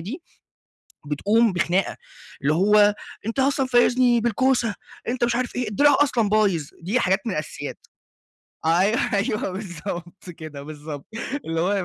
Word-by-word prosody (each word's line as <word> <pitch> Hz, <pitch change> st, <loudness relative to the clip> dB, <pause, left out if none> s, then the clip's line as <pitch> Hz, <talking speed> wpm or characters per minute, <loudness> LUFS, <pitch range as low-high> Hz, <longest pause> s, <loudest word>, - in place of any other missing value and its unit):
دي 240 Hz, -, -7 dB, 0.8 s
بتقوم 205 Hz, +9 st, +2 dB
بخناقة، 180 Hz, +2 st, 0 dB, 0.4 s
اللي 145 Hz, +2 st, +2 dB
هو 205 Hz, +3 st, +5 dB, 0.3 s
أنتَ 230 Hz, +4 st, -3 dB
أصلًا 275 Hz, 0 st, +2 dB
فايزني 245 Hz, -1 st, +4 dB
بالكوسة، 235 Hz, -1 st, +1 dB, 0.3 s
أنتَ 240 Hz, 0 st, -1 dB
مش 235 Hz, 0 st, +2 dB
عارف 250 Hz, -1 st, -2 dB
إيه، 245 Hz, -3 st, -1 dB
الدراع 285 Hz, +8 st, +4 dB
أصلًا 230 Hz, -7 st, +1 dB
بايظ، 195 Hz, -9 st, +2 dB
دي 205 Hz, +9 st, 0 dB
حاجات 190 Hz, -1 st, +2 dB
من 220 Hz, -, -1 dB
الأساسيات. 155 Hz, -2 st, -5 dB, 0.9 s
أيوه، 185 Hz, +8 st, +3 dB
أيوه 205 Hz, -1 st, 0 dB
بالضبط 175 Hz, -1 st, -7 dB
كده، 155 Hz, -4 st, -9 dB
بالضبط 150 Hz, -1 st, -8 dB, 0.4 s
اللي 165 Hz, 0 st, -2 dB
هو 185 Hz, +4 st, +1 dB
205 Hz, 135 wpm, -23 LUFS, 170-240 Hz, 0.9 s, هو